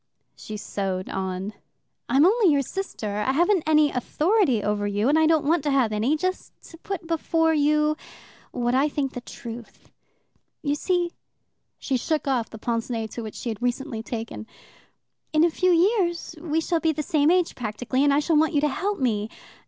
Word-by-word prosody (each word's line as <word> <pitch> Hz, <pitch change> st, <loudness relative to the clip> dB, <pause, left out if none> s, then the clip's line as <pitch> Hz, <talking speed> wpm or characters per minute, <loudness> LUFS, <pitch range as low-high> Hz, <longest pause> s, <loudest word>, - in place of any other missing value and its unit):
She 215 Hz, -, -7 dB
sewed 190 Hz, -2 st, -3 dB
on. 190 Hz, +2 st, -3 dB, 0.6 s
"I'm 270 Hz, +5 st, +5 dB
only 410 Hz, -2 st, +4 dB
your 280 Hz, -1 st, +2 dB
sister. 230 Hz, -, -4 dB
I 235 Hz, +5 st, 0 dB
haven't 350 Hz, +5 st, +3 dB
any 305 Hz, -1 st, +4 dB
authority 300 Hz, -, +1 dB
over 205 Hz, 0 st, 0 dB
you, 205 Hz, +3 st, 0 dB
and 300 Hz, +3 st, +4 dB
I 315 Hz, -, +4 dB
don't 315 Hz, -2 st, +3 dB
want 325 Hz, +2 st, +3 dB
to -, -, +2 dB
have 265 Hz, -5 st, +2 dB
any. 235 Hz, +9 st, +1 dB
Just 370 Hz, +4 st, -4 dB
to 330 Hz, -, -12 dB
put 370 Hz, -2 st, -5 dB
before 325 Hz, 0 st, +1 dB
you 300 Hz, 0 st, +2 dB, 0.5 s
what 240 Hz, 0 st, -1 dB
I 275 Hz, +4 st, +3 dB
think 275 Hz, -2 st, -2 dB
the 245 Hz, -, -6 dB
truth. 235 Hz, -1 st, -10 dB, 0.7 s
You 285 Hz, -1 st, +1 dB
see" 350 Hz, +3 st, 0 dB, 0.7 s
she 265 Hz, -, -1 dB
shook 305 Hz, +4 st, -1 dB
off 250 Hz, -4 st, 0 dB
the 220 Hz, -, -9 dB
pince 230 Hz, +2 st, -2 dB
nez 225 Hz, -3 st, -3 dB
to 235 Hz, -, -5 dB
which 215 Hz, -2 st, -7 dB
she 240 Hz, -, -5 dB
had 220 Hz, 0 st, -5 dB
recently 245 Hz, -1 st, -2 dB
taken 225 Hz, -1 st, -6 dB, 0.9 s
"in 310 Hz, +1 st, +4 dB
a 340 Hz, -, +4 dB
few 365 Hz, +3 st, +1 dB
years 345 Hz, -2 st, +1 dB
we 320 Hz, -1 st, 0 dB
shall 335 Hz, 0 st, 0 dB
be 320 Hz, -1 st, +2 dB
the 305 Hz, -, -3 dB
same 295 Hz, +1 st, +2 dB
age 360 Hz, -1 st, +2 dB
practically, 245 Hz, +3 st, -2 dB
and 285 Hz, -, +4 dB
I 285 Hz, +1 st, +3 dB
shall 320 Hz, 0 st, +2 dB
want 315 Hz, +1 st, +2 dB
you 285 Hz, -, +3 dB
to 300 Hz, -, +2 dB
help 395 Hz, +8 st, -2 dB
me. 220 Hz, -5 st, 0 dB
285 Hz, 190 wpm, -25 LUFS, 230-325 Hz, 0.9 s, I'm